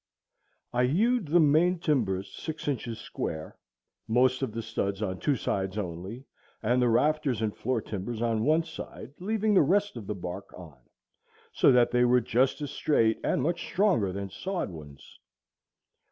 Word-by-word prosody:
I 125 +1 +3
hewed 215 - +2
the 170 +4 +4
main 165 +4 +4
timbers 110 - -1
six 160 -2 -6
inches 120 -5 -2
square, 80 0 -6 0.5
most 125 +3 +3
of 130 -4 -1
the 115 +1 -5
studs 100 -2 -2
on 95 -3 -3
two 145 - +1
sides 95 -4 -2
only, 95 +6 -5 0.4
and 120 +3 +2
the 125 - +3
rafters 145 0 +2
and 110 -2 -1
floor 125 -1 -1
timbers 110 +3 -5
on 115 -2 0
one 155 +4 +3
side, 140 -4 -9
leaving 215 +3 0
the 190 - +6
rest 200 +1 +1
of 105 -4 -8
the 105 - -3
bark 90 +1 -7
on, 80 -7 -12 0.7
so - - +4
that 125 -1 +4
they 125 0 +3
were 125 +1 +5
just 125 +5 +1
as 145 - -4
straight 115 -7 +2
and - - +1
much 170 +3 0
stronger 175 - +1
than 100 0 -5
sawed 185 - -3
ones. 75 -4 -12
125 Hz, 170 wpm, -28 LUFS, 100-155 Hz, 0.7 s, the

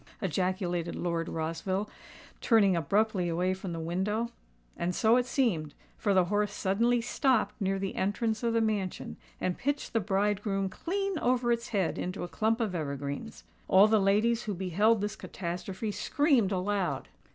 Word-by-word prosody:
ejaculated 180 -1 -1
Lord 170 -1 -2
Rossville, 165 +5 -2 0.5
turning 205 -6 +4
abruptly 190 +3 +1
away 180 +3 +1
from 190 -1 -6
the 165 - -4
window. 200 +8 -1 0.4
And 175 +1 -2
so 225 +1 +4
it 250 0 +2
seemed; 185 - 0 0.2
for 200 -2 0
the 185 -1 +5
horse 205 +2 0
suddenly 230 +5 +1
stopped 255 +1 +1
near 195 0 +1
the 195 0 -3
entrance 220 +3 0
of 235 -1 0
the 230 - +3
mansion, 210 -4 -2 0.2
and 180 -1 -2
pitched 285 +2 -2
the 225 - +3
bridegroom 195 0 0
clean 390 - -2
over 245 -1 +2
its 235 0 0
head 195 -6 -1
into 180 +2 -3
a - - -3
clump 220 +5 0
of 220 -5 -1
evergreens. 140 - -4 0.2
All 195 +3 +7
the 215 -1 +3
ladies 220 +4 +2
who 205 -2 -2
beheld 195 +5 +2
this 210 +1 -2
catastrophe 185 +4 -5
screamed 260 - +2
aloud. 195 0 -1
200 Hz, 160 wpm, -30 LUFS, 180-225 Hz, 0.5 s, All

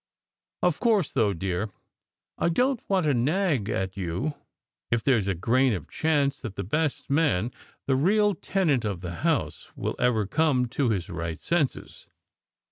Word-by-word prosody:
Of 180 -3 +2
course, 215 - +2
though, 110 -6 +3
dear, 95 +3 -2 0.7
I - - +2
don 255 +9 +2
t - - -31
want 190 -3 +2
to 145 - +3
nag 140 - +1
at 95 -2 -2
you 100 - -2 0.6
if 115 -1 +1
there 135 -3 +4
s 100 - -3
a 100 - 0
grain 125 +8 +2
of 90 -8 -4
chance 145 -3 0
that 110 -6 -6
the 100 - -3
best 150 - -1
man 140 - +2 0.3
the 135 - +2
real 205 +8 +3
tenant 160 - 0
of 100 -5 -3
the 85 -2 -5
house - - -1
will - - -2
ever 115 -4 +2
come 130 +3 +2
to 130 0 0
his 95 -6 -1
right 85 -2 -4
senses!" 170 -6 -2
130 Hz, 170 wpm, -26 LUFS, 100-160 Hz, 0.7 s, there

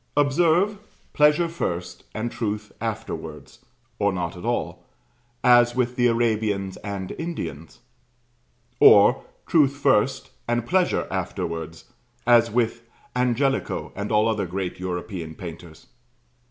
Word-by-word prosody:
Observe, 170 +8 +3 0.3
pleasure 150 +3 +4
first 90 - -4
and 115 +2 -3
truth 105 -1 -4
afterwards, - - -6 0.4
(or 100 0 +2
not 90 -2 -3
at 90 - -10
all,) - - -2 0.6
as 120 -1 +5
with 125 -1 0
the 120 -1 +3
Arabians 110 -4 0
and 100 -3 -5
Indians; 85 - -6 1.0
or, 120 +6 +7 0.2
truth 145 -4 +3
first 130 0 +1 0.2
and 120 0 0
pleasure 185 +5 +1
afterwards, 80 0 -4 0.4
as 120 -1 +5
with 115 0 0 0.3
Angelico 125 +2 0
and 100 +2 -4
all 105 +1 +3
other 105 -4 -1
great 90 +1 -4
European 90 -2 -5
painters. 85 -2 -10
115 Hz, 115 wpm, -24 LUFS, 95-130 Hz, 1.0 s, or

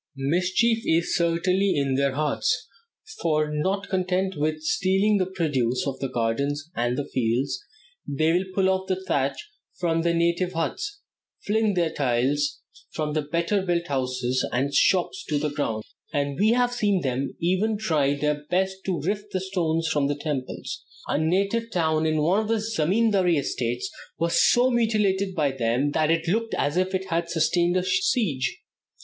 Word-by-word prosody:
Mischief 180 - +1
is 165 +1 +1
certainly 180 +3 +2
in 140 -2 +1
their 140 0 +1
hearts, 150 +2 0 0.5
for, 155 -2 +1
not 190 +6 -1
content 190 0 0
with 155 +1 -1
stealing 195 +5 +2
the 185 - +1
produce 145 -10 0
of 135 -2 -3
the 135 - -2
gardens 140 +7 -1
and 120 +3 0
fields, 125 - 0 0.5
they 155 +3 +1
will 180 +2 +1
pull 190 -1 +3
off 190 0 0
the 190 - +1
thatch 140 -6 0 0.4
from 165 -2 +1
the 170 0 +2
native 170 +2 +1
huts, 405 - -3 0.4
fling 215 -1 +1
the 170 -3 +1
tiles 140 +1 0 0.3
from 150 -1 -3
the 155 - +1
better 170 +7 0
built 175 -2 0
houses 130 -2 -1
and 135 +3 0
shops 185 +5 +2
to 150 - -1
the 150 0 -1
ground, 115 -7 -2 0.3
and 140 +1 -1
we 210 +2 +4
have 245 +1 +3
even 140 -11 0
seen 180 +2 +1
them 220 -1 -1
try 150 -9 +1
their 150 +1 -1
best 190 +1 +1
to 180 -5 -1
rift 205 +5 -3
the 185 - -1
stones 165 -4 -1
from 145 -3 +1
the 145 - 0
temples. 145 -3 -4 0.3
A - - +1
native 200 +8 +1
town 160 -5 +1
in 155 0 +1
one 180 +6 +3
of 220 - -2
the 225 - +2
zemindary 205 -3 +2
estates 120 -3 -2 0.3
was 170 +1 +2
so 250 +2 +4
mutilated 205 -5 +1
by 145 -4 +1
them 130 +2 0
that 155 +1 +1
it 165 0 +1
looked 225 +5 0
as 145 - 0
if 185 +1 +1
it 190 0 -3
had 170 0 0
sustained 175 +2 +2
a 180 - +1
siege. 185 - 0
165 Hz, 165 wpm, -25 LUFS, 145-190 Hz, 0.5 s, we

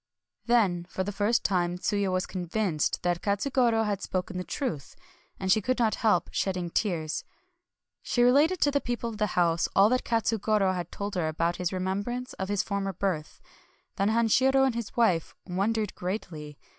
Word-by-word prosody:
Then 195 -8 +2
for 190 - -2
the 205 - -3
first 205 +4 +1
time 175 -2 0
Tsuya 200 +1 0
was 185 +1 0
convinced 180 -3 -1
that 175 -1 0
Katsugoro 225 +2 +1
had 205 -2 -2
spoken 185 0 -3
the - - -3
truth; 180 - -4 0.4
and 190 -1 0
she 215 - +4
could 255 +5 0
not 230 -3 +2
help 220 -2 +1
shedding 180 -3 -1
tears. 165 -7 -1 0.8
She 240 - +1
related 295 +9 +4
to 285 - +4
the 285 0 +1
people 240 -1 -3
of 215 - -9
the 210 - +2
house 170 -1 +3
all 200 +2 +6
that 255 +1 +1
Katsugoro 215 -4 +1
had 175 -2 -4
told 200 0 -5
her 175 -4 0
about 165 +2 -1
his 180 -1 -1
remembrance 200 +7 -3
of 190 0 -3
his 205 -1 +1
former 200 -1 -2
birth. 175 -4 -3 0.6
Then 200 +1 +2
Hanshiro 255 +4 +3
and 265 - +1
his 235 -1 -6
wife 185 -9 +2
wondered 205 +3 -1
greatly. 160 -6 -5
200 Hz, 175 wpm, -28 LUFS, 180-230 Hz, 0.8 s, all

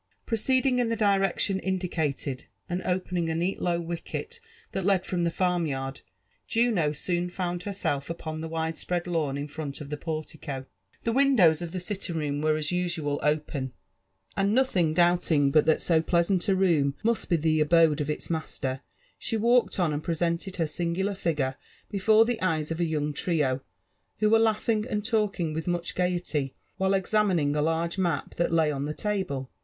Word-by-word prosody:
Proceeding 255 +3 +1
in 240 -2 +1
the 230 - +1
direction 195 -2 +2
indicated, 160 -9 -2 0.2
and 180 +1 -2
opening 180 -2 -1
a 160 - -1
neat 175 +4 -1
low 170 -1 +1
wicket 175 - -5 0.3
that 195 - -2
led 190 -1 +2
from 175 -2 -1
the - - +2
farmyard, 160 -7 -1 0.5
Juno 225 -10 +2
soon 175 +4 -2
found 175 -1 -3
herself 180 -8 -2
upon 160 -1 -5
the 160 - -5
wide^ 160 0 -2
spread 175 -1 -2
lawn 160 -6 -1
in 145 +1 -4
front 145 -1 -6
of 150 -1 -8
the 150 - -2
portico. 155 -3 -5 0.4
The 230 - +1
windows 230 - +4
of 170 -1 -5
the 185 - -3
sitting 180 -2 -2
room 145 -2 -1
>Krere 155 0 +2
as 150 -1 0
usual 170 -5 -1
open, 150 -3 -1 0.6
and 200 +2 +2
nothing 180 -12 +2
doubling 175 -5 +3
but 155 +1 +4
that 160 - +3
so 165 -2 +3
pleasant 175 +2 +1
a 195 - +4
room 160 -7 +2
must 225 0 +1
be 175 - +4
the 160 0 +2
abode 155 -1 +4
of 145 - -2
its 150 - -2
master, 135 -5 -2 0.4
she 225 - -1
walked 235 0 +3
on 170 -4 +2
and 145 +1 -3
presented 170 +2 -1
her 165 - 0
singular 175 +5 -1
figure 150 -8 -1 0.3
before 215 +3 +5
the 235 -1 -2
eyes 160 -4 0
of 165 - -3
a 170 - +2
young 150 -2 -1
trio, 145 -5 0 0.6
who 215 0 +2
were 225 - +6
laughing 220 0 +2
and 210 -3 -2
talking 210 -8 0
with 160 +2 -4
much 175 -1 -1
gaiety 175 -6 -1 0.2
while 190 +1 +2
examining 190 -7 +2
a 150 - +1
large 165 +3 0
map 175 -3 -1
that 170 - +1
lay 160 -2 +3
on 140 -1 -2
the 150 +1 -4
table. 185 -11 -2
170 Hz, 180 wpm, -27 LUFS, 155-195 Hz, 0.6 s, were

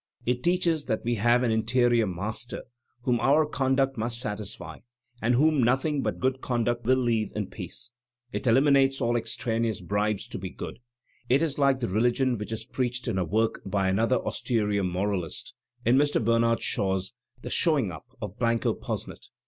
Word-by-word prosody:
It 125 0 0
teaches 170 -2 +1
that 110 - -1
we 120 - +1
have 120 +3 +3
an 120 - +2
interior 115 0 +2
Master 105 +6 -4 0.4
whom 120 -2 +2
our 140 +6 +4
conduct 135 -2 +1
must 115 +1 -2
satisfy 105 -3 -5 0.4
and 120 +2 +2
whom 150 +1 +4
nothing 135 +5 +2
but - - -2
good 130 0 0
conduct 120 -1 -1
will 130 +2 +4
leave 115 -4 0
in 105 -1 -1
peace. 105 +4 -6 0.4
It 130 - -3
eliminates 135 +2 +4
all 120 -2 +1
extraneous 115 -1 -1
bribes 105 +3 -1
tb - - -7
be - - -4
good. - - -8 0.5
It 135 +6 +4
is 150 -3 -2
like 135 -2 +3
the 120 - 0
religion 120 +4 +1
which 105 - -5
is 110 0 -4
preached 125 -1 -3
in 100 -5 0
a - - +2
work 110 +6 0
by 95 -1 0
another 115 +6 +2
austere 105 -4 -1
moralist 90 -1 -2 0.2
— 120 0 -33
in 120 +3 +5
Mr. 145 +1 +3
Bernard 115 0 +2
Shaw's 95 -1 0 0.3
"The - - -5
Showing 145 - +2
Up 80 +8 -10 0.2
of 105 +2 -7
Blanco 115 -1 +1
Posnet." - - -6
120 Hz, 175 wpm, -27 LUFS, 110-130 Hz, 0.5 s, in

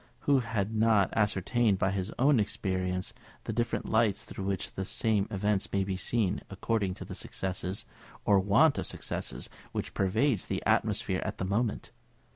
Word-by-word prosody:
Who 140 -2 +4
has 110 -4 -1
not 110 -3 +3
ascertained 105 +1 +2
by 95 0 +1
his 95 0 -2
own 135 0 +4
experience 95 -3 -1 0.3
the 110 - -3
different 120 +1 -1
lights 110 -2 +2
through 95 - -6
which 95 -1 -2
the 95 - -4
same 105 +1 +1
events 105 -1 0
may 100 -1 +1
be 95 0 -2
seen, 100 +1 0
according 100 -1 -1
to - - -8
the - - -7
success, 95 +1 -3 0.4
or 100 -1 +5
want 105 +11 +4
of - - -3
success, - - -4 0.3
which - - -3
pervades 105 +3 +1
the - - -2
atmosphere - - +1
at - - -4
the 95 - -2
moment? 105 +4 -1
100 Hz, 165 wpm, -30 LUFS, 95-115 Hz, 0.4 s, or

